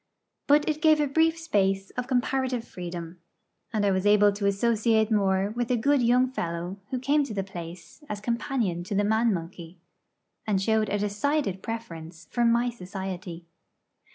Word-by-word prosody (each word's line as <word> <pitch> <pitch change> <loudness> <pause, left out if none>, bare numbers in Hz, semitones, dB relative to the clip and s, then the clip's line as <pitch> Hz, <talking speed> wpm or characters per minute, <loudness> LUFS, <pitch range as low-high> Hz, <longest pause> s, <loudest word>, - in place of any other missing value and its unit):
But 295 +1 +4
it 310 -1 -1
gave 310 -1 +5
a 295 - +3
brief 320 +3 +2
space 195 -11 0
of 250 0 -4
comparative 255 -1 0
freedom; 175 -1 -7 0.5
and 215 -2 0
I 200 - +3
was 190 +1 +1
able 205 0 +6
to 200 0 -2
associate 220 +2 +2
more 195 -1 +2
with 240 -1 -2
a 250 - +2
good 280 +4 +2
young 250 +2 +3
fellow 175 -2 -4
who 260 - -2
came 285 +4 +2
to 225 -7 -6
the 195 - -1
place 175 - -10
as 210 - -3
companion 230 -5 -1
to 200 +2 -3
the 205 - +2
man 220 +2 +2
monkey, 170 -1 -6 0.7
and 200 -3 +2
showed 220 +1 +1
a 205 - 0
decided 210 +1 -1
preference 170 -8 -7
for 240 - +1
my 235 +1 +3
society. 185 -4 -7
210 Hz, 170 wpm, -26 LUFS, 190-245 Hz, 0.7 s, able